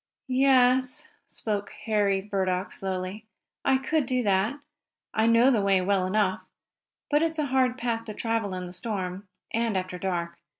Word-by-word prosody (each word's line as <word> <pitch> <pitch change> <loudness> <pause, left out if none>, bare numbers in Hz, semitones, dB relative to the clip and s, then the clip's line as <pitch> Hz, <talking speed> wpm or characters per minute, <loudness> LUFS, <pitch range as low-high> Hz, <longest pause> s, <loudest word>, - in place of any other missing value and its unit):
"Yes," 260 +2 +3 0.2
spoke 205 -2 -3
Henry 205 -3 +2
Burdock, 190 -2 -1
slowly, 190 +2 -4 0.4
"I 265 - +4
could 270 +1 0
do 255 -1 +1
that. 205 +6 +1 0.5
I 220 +1 +2
know 230 +3 +5
the 225 -5 +2
way 195 -1 +3
well 190 0 +1
enough. 195 -1 +1 0.7
But 295 +1 +4
it's 325 0 0
a 305 - +1
hard 255 -1 +3
path 230 -2 -2
to 215 -2 -7
travel 225 -4 -1
in 180 0 -4
the 180 - -9
storm, 190 -1 -4 0.2
and 230 -3 0
after 185 -1 -4
dark. 175 -3 -3
215 Hz, 160 wpm, -27 LUFS, 190-250 Hz, 0.7 s, know